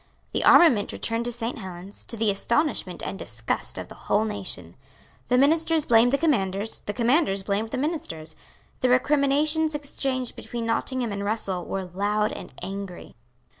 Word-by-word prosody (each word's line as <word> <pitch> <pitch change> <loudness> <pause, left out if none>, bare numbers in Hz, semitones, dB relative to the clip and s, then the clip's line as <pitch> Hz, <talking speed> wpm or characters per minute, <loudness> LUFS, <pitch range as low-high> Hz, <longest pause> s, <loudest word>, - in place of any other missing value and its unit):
The - - 0
armament 250 -12 +6
returned 230 0 -2
to 240 - 0
Saint 235 0 -3
Helens, 185 0 -7
to 230 - -7
the 220 -1 +2
astonishment 235 - 0
and 195 - -5
disgust 115 +1 -2
of - - -5
the - - -11 0.2
whole 215 - +3
nation. 190 - -2 0.5
The 250 - +3
ministers 320 +3 +3
blamed 230 +1 +5
the 280 - +3
commanders; 210 - 0
the 205 - -1
commanders 235 - +2
blamed 205 +3 -1
the 260 - -3
ministers. 255 - -3 0.4
The 255 - +2
recriminations 295 +4 +3
exchanged 270 -3 -3
between 235 -1 -5
Nottingham 235 +1 0
and 200 0 -3
Russell 200 -4 -2
were 195 - -2
loud 205 +4 0
and - - -8
angry. 195 -2 -6
225 Hz, 160 wpm, -25 LUFS, 195-275 Hz, 0.5 s, armament